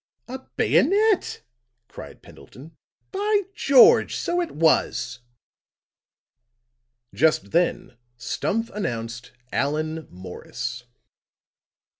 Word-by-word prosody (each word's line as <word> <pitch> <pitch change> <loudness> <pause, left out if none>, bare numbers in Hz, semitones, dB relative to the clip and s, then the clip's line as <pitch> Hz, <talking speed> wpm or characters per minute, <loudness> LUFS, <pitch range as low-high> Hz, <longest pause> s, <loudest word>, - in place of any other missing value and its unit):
"A 260 +2 -6 0.2
bayonet," 420 0 +2 0.4
cried - - -12
Pendleton. 150 +6 -15 0.4
"By 410 +1 +1
George! 470 +2 +5
So 350 +1 -1
it 345 - -3
was." 140 -5 +1 1.9
Just 155 -10 +1
then 170 -6 0 0.2
Stumph 225 - -2
announced 120 - -5 0.2
Allan 155 +2 -2
Morris. 120 +7 -7
160 Hz, 75 wpm, -23 LUFS, -, 1.9 s, George